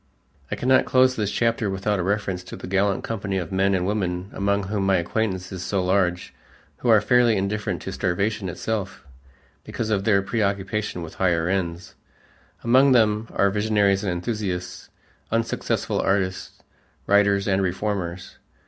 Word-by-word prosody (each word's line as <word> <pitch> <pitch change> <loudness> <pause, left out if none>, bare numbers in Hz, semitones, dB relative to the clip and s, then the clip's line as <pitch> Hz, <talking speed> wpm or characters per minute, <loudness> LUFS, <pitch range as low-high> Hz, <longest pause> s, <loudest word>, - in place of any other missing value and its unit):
I - - -2
cannot 130 +1 +3
close 130 0 +4
this 105 -4 -1
chapter 115 -1 0
without 95 +1 -1
a - - 0
reference 95 -2 -1
to - - -8
that - - -8
gallant 100 0 +1
company 100 -3 -3
of 90 -2 -4
men 95 +1 +2
and 90 -1 0
women 95 -2 -2
among 100 0 0
whom 100 +1 -2
my 95 0 +3
acquaintance 95 +1 -2
is 95 -2 -5
so 95 0 -1
large, 90 -2 0 0.4
who 120 - -2
are 110 -2 +7
fairly 120 -1 +3
indifferent 100 +2 -2
to 95 - -5
starvation 100 +2 -1
itself 95 +1 -4 0.6
because 110 -2 -4
of 100 -2 +1
their 100 -3 +3
preoccupation 100 -2 -2
with 80 - -8
higher 85 -3 +2
ends. 90 -1 -2 0.7
Among 130 +3 +5
them 110 -2 +3
are 100 0 +3
visionaries 105 -2 +2
and 95 - -1
enthusiasts, 90 -1 -4 0.4
unsuccessful 115 0 -1
artists, 95 -1 -2 0.4
writers, 100 0 +3
and 95 -1 +2
reformers. 95 -1 -3
100 Hz, 155 wpm, -23 LUFS, 95-105 Hz, 0.7 s, are